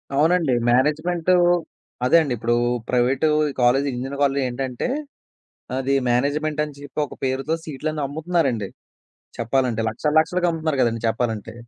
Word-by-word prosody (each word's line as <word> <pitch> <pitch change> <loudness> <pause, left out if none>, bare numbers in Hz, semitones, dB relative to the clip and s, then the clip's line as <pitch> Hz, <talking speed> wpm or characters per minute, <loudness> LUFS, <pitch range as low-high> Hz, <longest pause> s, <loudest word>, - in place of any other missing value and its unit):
అవునండి. 160 -1 +3 0.2
మేనేజ్‌మెంటూ 155 +7 +2 0.7
అదే 170 - +6
అండి. 145 -5 -1
ఇప్పుడు 120 +2 0 0.3
ప్రైవేటూ 125 +5 +2 0.3
కాలేజీ, 135 +4 +3
ఇంజినీరింగ్ 135 +3 -4
కాలేజీలో 140 0 +2
ఏంటంటే, 125 - -3 0.9
అది 135 +1 0 0.2
మేనేజ్‌మెంట్ 150 +4 0
అని 150 -2 -10
చెప్పి 145 +1 -5
ఒక - - -11
పేరుతో 135 +4 -1
సీట్లన్నీ 155 +1 -4
అమ్ముతున్నారండి. 145 - -1 0.7
చెప్పాలంటే 120 -1 0
లక్షల 135 +7 -2
లక్షలకమ్ముతున్నారు 160 -3 0
గదండీ 115 -1 +1
చెప్పాలంటే. 115 -2 -2
140 Hz, 120 wpm, -22 LUFS, 125-155 Hz, 0.9 s, అదే